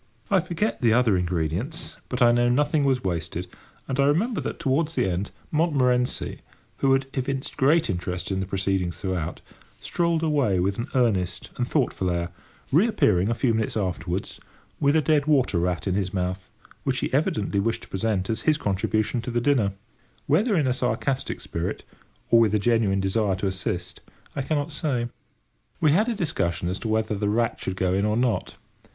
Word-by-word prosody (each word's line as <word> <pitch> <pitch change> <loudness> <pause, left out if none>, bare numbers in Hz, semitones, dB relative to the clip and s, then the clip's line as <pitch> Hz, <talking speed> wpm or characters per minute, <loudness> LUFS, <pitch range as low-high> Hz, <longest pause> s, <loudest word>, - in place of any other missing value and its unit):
I 195 - +5
forget 180 +5 -2
the 115 -3 +4
other 115 -4 +4
ingredients, 90 - -2
but 125 -1 +1
I 120 - +7
know 120 0 +3
nothing 145 +3 +2
was 130 -2 +1
wasted; 85 -1 -2 0.4
and 135 0 -2
I 140 - +5
remember 200 - +1
that, - - -4
towards 150 +4 0
the - - +2
end, 95 +2 -2 0.2
Montmorency, 130 -6 +1 0.4
who 135 -1 +3
had 135 0 +2
evinced 135 +1 -2
great 155 +5 +3
interest 90 -1 -3
in 95 - 0
the 95 - -3
proceedings 95 -3 -1
throughout, 90 -3 -3 0.4
strolled 170 -2 0
away 140 - +2
with 95 +3 0
an 120 - -2
earnest 95 -8 0
and 125 - -1
thoughtful 125 - 0
air, 85 0 -1 0.4
reappearing, 130 - +3
a 115 - +1
few 120 -1 +1
minutes 110 0 -1
afterwards, 90 -1 -3 0.4
with 145 +1 +3
a 155 - +3
dead 150 -1 +2
water 130 - +3
rat 90 0 -1
in 95 - 0
his 95 -1 -1
mouth, 90 0 -2 0.3
which - - 0
he - - -2
evidently 100 - +1
wished 115 +3 -1
to - - -11
present 95 -1 -1
as 115 - -2
his 155 -1 +3
contribution 110 +2 0
to 120 - -5
the 120 0 0
dinner; 120 -6 +2 0.5
whether 200 - +3
in 155 -5 +2
a 130 - +2
sarcastic 130 +2 -1
spirit, 85 +1 -4 0.5
or 115 - +7
with 110 -2 +4
a - - +5
genuine 105 -3 +2
desire 95 +1 +1
to 95 - -4
assist, 95 -2 -3 0.3
I - - -1
cannot 145 +2 -1
say. 135 -6 -1 0.7
We 155 -3 +4
had 210 +10 +3
a 235 - -1
discussion 90 - -1
as 95 +1 -2
to 110 - -4
whether 110 0 0
the 105 0 -1
rat 115 +2 0
should 95 - -3
go 95 -1 0
in 100 +1 +1
or 105 +1 +1
not. 120 -2 0
115 Hz, 185 wpm, -25 LUFS, 95-140 Hz, 0.7 s, I